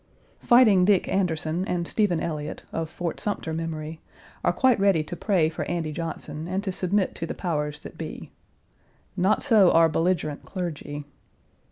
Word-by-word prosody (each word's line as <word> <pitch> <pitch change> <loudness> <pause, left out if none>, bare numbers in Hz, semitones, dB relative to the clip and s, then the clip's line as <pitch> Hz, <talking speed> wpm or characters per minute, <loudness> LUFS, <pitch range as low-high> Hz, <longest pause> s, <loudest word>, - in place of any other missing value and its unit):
Fighting 230 -7 +6
Dick 195 0 +3
Anderson 170 -2 0
and 170 -1 -1
Stephen 200 -6 +1
Elliott, 150 -2 -4
of 165 -1 -2
Fort 175 0 -4
Sumter 200 -6 -3
memory, 160 -1 -5 0.4
are - - +3
quite 255 -4 +3
ready 195 -5 +3
to 165 - -7
pray 180 -5 +2
for 160 - -4
Andy 170 -3 -2
Johnson, 160 -1 -5
and 190 +2 -2
to 195 - -2
submit 185 +1 0
to 165 - -5
the - - -5
powers 150 -4 -2
that - - -11
be. - - -7 0.8
Not 190 +2 +2
so 215 -9 +6
our 165 -1 +5
belligerent 165 -2 0
clergy. 150 -5 -5
170 Hz, 160 wpm, -25 LUFS, 160-190 Hz, 0.8 s, Fighting